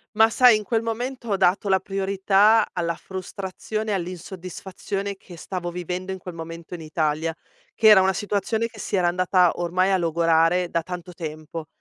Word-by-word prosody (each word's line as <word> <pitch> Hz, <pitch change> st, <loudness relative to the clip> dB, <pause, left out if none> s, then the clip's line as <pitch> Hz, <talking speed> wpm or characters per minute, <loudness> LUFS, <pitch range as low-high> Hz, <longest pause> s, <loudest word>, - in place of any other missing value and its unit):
Ma 220 Hz, +1 st, +6 dB
sai 245 Hz, -1 st, +6 dB
in 215 Hz, -, -5 dB
quel 225 Hz, 0 st, 0 dB
momento 235 Hz, +2 st, -4 dB
ho 200 Hz, -, +1 dB
dato 190 Hz, +2 st, +2 dB
la 190 Hz, 0 st, +4 dB
priorità 195 Hz, +3 st, +3 dB
alla 170 Hz, -1 st, -1 dB
frustrazione 195 Hz, +3 st, -5 dB
e -, -, +1 dB
all'insoddisfazione 185 Hz, +2 st, -5 dB
che 180 Hz, -2 st, -14 dB
stavo 175 Hz, +1 st, -5 dB
vivendo 180 Hz, +2 st, -4 dB
in 190 Hz, -, -4 dB
quel 180 Hz, -1 st, -9 dB
momento 165 Hz, +1 st, -8 dB
in 175 Hz, -, -6 dB
Italia, 155 Hz, 0 st, -1 dB, 0.4 s
che 220 Hz, -, +3 dB
era 210 Hz, -3 st, +9 dB
una 190 Hz, 0 st, +3 dB
situazione 205 Hz, +3 st, -1 dB
che 225 Hz, -1 st, -17 dB
si 200 Hz, 0 st, -2 dB
era 180 Hz, -2 st, +2 dB
andata 180 Hz, 0 st, +3 dB
ormai 180 Hz, +2 st, +1 dB
a -, -, +4 dB
logorare 165 Hz, 0 st, +2 dB
da 170 Hz, -, 0 dB
tanto 180 Hz, 0 st, -7 dB
tempo 155 Hz, -1 st, -7 dB
185 Hz, 180 wpm, -24 LUFS, 170-200 Hz, 0.4 s, era